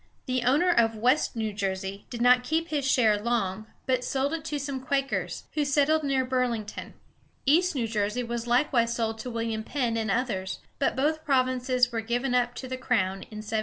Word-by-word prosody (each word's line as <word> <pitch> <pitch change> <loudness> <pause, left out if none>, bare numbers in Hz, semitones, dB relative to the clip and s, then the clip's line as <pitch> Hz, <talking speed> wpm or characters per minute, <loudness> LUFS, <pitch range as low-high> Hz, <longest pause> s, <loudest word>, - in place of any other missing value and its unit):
The 255 -1 0
owner 300 +9 +4
of 225 -8 +3
West 250 +7 +2
New 220 -2 -2
Jersey 195 0 -3
did 235 -1 -3
not 250 0 +6
keep 320 +5 -1
his 285 -3 0
share 220 -6 +3
long, 220 -2 -1 0.2
but 255 -1 +1
sold 275 +4 -1
it 325 -2 -3
to 300 -2 -2
some 280 -1 -3
Quakers, 275 0 -1
who 300 - +1
settled 290 +2 +2
near 270 -2 +1
Bur´ling 250 -4 0
ton. 215 - -8 0.5
East 340 +5 +3
New 240 -4 0
Jersey 215 +2 -1
was 235 0 -4
likewise 240 -2 +2
sold 225 -1 -2
to 250 - -5
William 230 -2 -2
Penn 240 -3 -1
and 220 -1 -1
others; 195 -4 -1 0.2
but 275 - +1
both 310 +4 0
provinces 255 -2 +2
were 230 -1 -1
given 245 +3 -1
up 245 -1 +1
to 260 - -6
the 255 0 -4
crown 195 -7 0
in 215 0 -8
1702. 220 +1 -1
250 Hz, 200 wpm, -27 LUFS, 225-275 Hz, 0.5 s, not